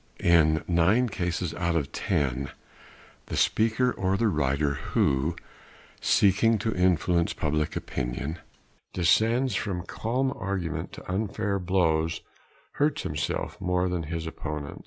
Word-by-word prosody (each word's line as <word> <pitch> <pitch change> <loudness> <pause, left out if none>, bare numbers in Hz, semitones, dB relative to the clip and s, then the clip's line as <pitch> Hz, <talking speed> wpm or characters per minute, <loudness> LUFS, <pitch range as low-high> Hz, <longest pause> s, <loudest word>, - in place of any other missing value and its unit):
In 80 -2 +4
nine 95 +9 +3
cases 90 -3 -2
out 85 -1 -1
of 75 -4 -1
ten 70 -1 -1 0.8
the - - -4
speaker 115 +3 +2
or 95 -2 0
the 115 0 +2
writer 70 -3 +1
who, 70 +3 0 0.7
seeking 105 +3 +4
to 110 +2 -1
influence 90 -1 +2
public 75 0 -1
opinion, 70 +6 -3 0.6
descends 115 +8 +3
from 95 -5 -2
calm 130 +6 -1
argument 95 -4 -3
to - - -10
unfair 100 +1 -1
blows 80 -3 +1 0.5
hurts 145 0 0
himself 75 +6 -3
more 90 0 +1
than 90 -1 -1
his 85 -1 -3
opponent. 75 -3 -5
90 Hz, 120 wpm, -27 LUFS, 80-100 Hz, 0.8 s, In